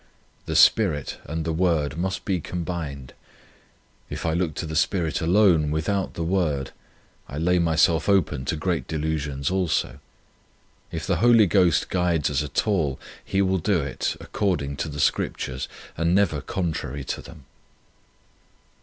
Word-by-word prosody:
The - - -2
Spirit 80 -11 +4
and 80 +1 -4
the 80 - -1
Word 80 -5 +1
must 95 +3 -3
be 95 -3 0
combined. 75 -7 -5 1.0
If - - -5
I 80 - +1
look 85 -3 -1
to - - -3
the 80 0 -5
Spirit 85 0 +1
alone 85 -3 +4
without 85 +6 -1
the 85 - -2
Word, 80 -7 0 0.6
I 70 - -6
lay 90 +3 +2
myself 80 +1 +2
open 95 -9 +2
to 80 - -1
great 85 +2 -2
delusions 75 -2 -2
also. 85 -8 0 0.9
If - - -4
the - - +1
Holy 115 -2 +6
Ghost 90 -4 +3
guides 85 -5 +1
us 70 0 +1
at 75 -1 -1
all, 85 - 0 0.2
He 100 0 +1
will 95 0 +1
do 95 +1 +1
it 70 -2 -3
according 75 -9 -2
to 80 - -3
the 75 -1 -6
Scriptures 65 -2 -1 0.3
and 85 +2 +1
never 85 -8 +2
contrary 80 -6 -3
to - - -4
them. 80 -4 -13
80 Hz, 150 wpm, -24 LUFS, 75-95 Hz, 1.0 s, Holy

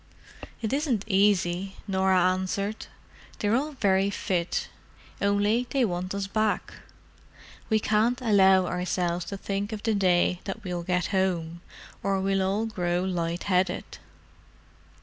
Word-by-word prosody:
"It 220 +3 -1
isn't 275 -8 0
easy," 195 -2 +2
Norah 190 -2 +3
answered. 195 +3 -3 0.5
"They're 210 +2 +1
all 295 +4 -1
very 195 -5 +2
fit, 180 -3 -1 0.5
only 205 +4 +2
they 270 -3 +2
want 185 0 -3
us 200 -1 -2
back. 215 +2 -1 1.0
We 220 -1 +3
can't 220 +4 +1
allow 190 -5 +5
ourselves 180 -1 -1
to 200 - -5
think 200 +2 -3
of 215 -1 -5
the 225 - +1
day 180 -2 +2
that 210 +3 -5
we'll 180 -2 -3
get 180 0 -1
home, 170 -3 0 0.4
or 195 -1 0
we 195 0 +1
all 195 +4 0
grow 180 -5 -1
light 175 -2 -2
headed." 185 -2 -1
195 Hz, 130 wpm, -27 LUFS, 180-210 Hz, 1.0 s, allow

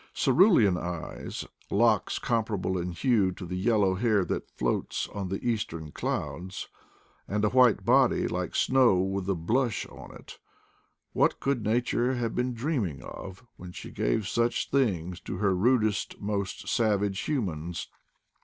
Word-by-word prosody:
Cerulean 130 - +5
eyes; 90 -2 -5 0.2
locks 110 0 +2
comparable 110 -5 -1
in 90 0 -2
hue 100 0 +2
to 90 - -8
the 90 - -6
"yellow 100 -1 +2
hair 105 -1 +2
that - - -3
floats 60 -1 -2
on 100 -2 -5
the 100 +5 -3
eastern 85 -9 -2
clouds, 95 - -4 0.3
" - - -35
and 105 +1 0
a - - +3
white 125 -4 +4
body, - - +4
like - - -3
snow 130 -5 +4
with 95 +1 -1
a 95 - +2
blush 115 +8 0
on - - -12
it— - - -13 0.7
what - - +2
could 135 -5 -1
Nature 120 +3 +1
have 120 -2 -2
been 125 0 -1
dreaming 115 - -2
of 95 +5 -9
when 90 -1 -9
she - - -8
gave 95 - 0
such 120 +2 0
things 90 -10 0
to 95 +1 -6
her 100 -1 +2
rudest 110 +1 +1
most 100 -1 -3
savage 105 -4 +1
humans 90 - -2
105 Hz, 150 wpm, -28 LUFS, 90-120 Hz, 0.7 s, Cerulean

